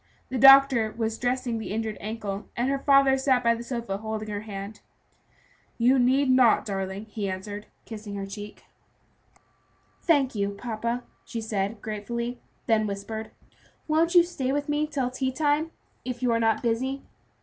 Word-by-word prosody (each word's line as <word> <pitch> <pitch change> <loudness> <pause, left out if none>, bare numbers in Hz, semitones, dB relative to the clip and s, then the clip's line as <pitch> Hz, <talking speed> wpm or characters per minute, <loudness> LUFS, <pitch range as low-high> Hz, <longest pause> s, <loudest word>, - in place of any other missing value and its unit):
The 255 - -2
doctor 270 -4 +7
was 225 -1 -2
dressing 245 -1 -1
the 220 - -6
injured 220 0 -2
ankle, 210 -2 -5
and 240 +2 +1
her 275 - 0
father 275 -1 +4
sat 260 -2 +2
by 235 0 +4
the 230 - -5
sofa 235 -5 -4
holding 220 0 -4
her 205 - -3
hand. 200 0 -7 1.0
"You 250 +3 +4
need 265 +3 +3
not, 255 -3 +4
darling," 195 0 -4
he 210 -2 -4
answered, 205 +2 -6 0.2
kissing 210 -2 -7
her 195 -1 -4
cheek. 205 +1 -9 1.4
"Thank 285 -6 +2
you, 200 -1 -2
papa," 235 +2 -3 0.2
she 230 - -5
said, 210 -1 -3
gratefully, 235 +3 -4 0.3
then 215 -2 +2
whispered, 220 +2 -5 0.6
"Won't 330 +3 +2
you 350 - +9
stay 270 -7 -3
with 285 +1 -1
me 295 +1 0
till 270 -4 -2
tea 260 0 -1
time, 295 +3 +1 0.3
if 250 0 -5
you 245 - +3
are 230 - +2
not 225 -1 +1
busy?" 260 +4 -1
235 Hz, 160 wpm, -26 LUFS, 215-265 Hz, 1.4 s, you